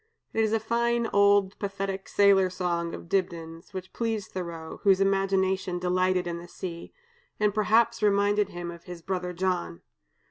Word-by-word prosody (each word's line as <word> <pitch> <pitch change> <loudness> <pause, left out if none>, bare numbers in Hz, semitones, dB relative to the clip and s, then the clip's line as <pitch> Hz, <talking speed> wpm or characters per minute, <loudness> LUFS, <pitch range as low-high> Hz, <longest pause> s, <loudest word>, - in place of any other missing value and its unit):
It 225 - +2
is 215 - +1
a 225 - +2
fine 235 +1 0
old 200 -1 +4
pathetic 195 -1 -4
sailor 195 -2 +5
song 175 -2 -2
of - - -10
Dibdin's, 165 -3 -3
which 185 -1 -7
pleased 225 -4 -2
Thoreau 170 -3 -6
(whose 195 -2 +4
imagination 190 -1 +1
delighted 185 0 +1
in 170 -1 -4
the 175 - -10
sea), 170 -1 -7 0.5
and 210 -1 +2
perhaps 220 +2 +3
reminded 205 0 +3
him 175 -1 -6
of 170 0 -12
his 175 -2 -9
brother 180 -1 -2
John. 170 - -2
190 Hz, 155 wpm, -27 LUFS, 175-205 Hz, 0.5 s, sailor